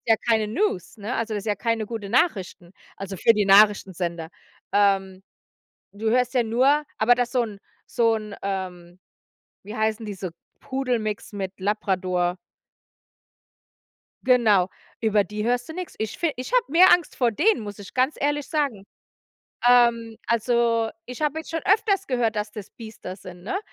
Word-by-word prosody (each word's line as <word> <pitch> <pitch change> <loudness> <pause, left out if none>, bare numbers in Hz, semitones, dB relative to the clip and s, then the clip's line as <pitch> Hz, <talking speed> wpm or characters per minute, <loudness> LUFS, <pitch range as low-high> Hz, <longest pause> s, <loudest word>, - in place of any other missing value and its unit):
ja 225 - +6
keine 220 -2 +3
News, 235 - -1
ne? 215 +4 -4
Also, 225 -1 -2
das 205 - -3
ist - - -13
ja 205 -2 0
keine 230 -1 -1
gute 220 -3 -6
Nachrichten, 195 - 0 0.2
also 195 0 -6
für 230 - +5
die 210 -1 +2
Nachrichtensender. 190 -5 +3 0.4
Ähm, 195 -2 +2 0.7
du 220 +2 -2
hörst 250 +2 +2
ja 245 -2 +3
nur 265 +7 +3
aber 240 +3 +4
dass 245 0 -1
so 250 -2 +2
'n 205 -3 -8 0.3
so 230 -1 +2
'n 215 -2 -6
ähm, 185 -2 -5 0.7
wie 210 +3 -8
heißen 220 0 -1
diese, 190 -3 -5 0.3
Pudelmix 245 -6 -3
mit 195 -1 -5
Labrador? 185 -3 0 1.9
Genau, 220 -8 +4 0.3
über 215 -2 +3
die 210 +1 -5
hörst 245 +3 0
du - - -6
nix. 365 -1 -6
Ich 220 0 -4
fi 335 -3 0
ich 255 - -6
habe - - +4
mehr 360 +3 +7
Angst 350 -3 +1
vor 240 -3 +2
denen, 335 - +2
muss 205 -1 -8
ich 200 - -11
ganz 260 +4 +1
ehrlich 290 0 -1
sagen. 275 -11 -1 0.8
Ähm, 235 -2 +4
also, 235 -1 +1 0.2
ich 250 +4 -7
habe 300 +1 0
jetzt 320 - -8
schon 325 0 -2
öfters 400 -1 +2
gehört, 235 -4 0
dass 210 0 -2
das 210 -3 -9
Biester 220 -5 -9
sind, 180 -2 -12
ne? 235 - -2
220 Hz, 165 wpm, -24 LUFS, 200-250 Hz, 1.9 s, mehr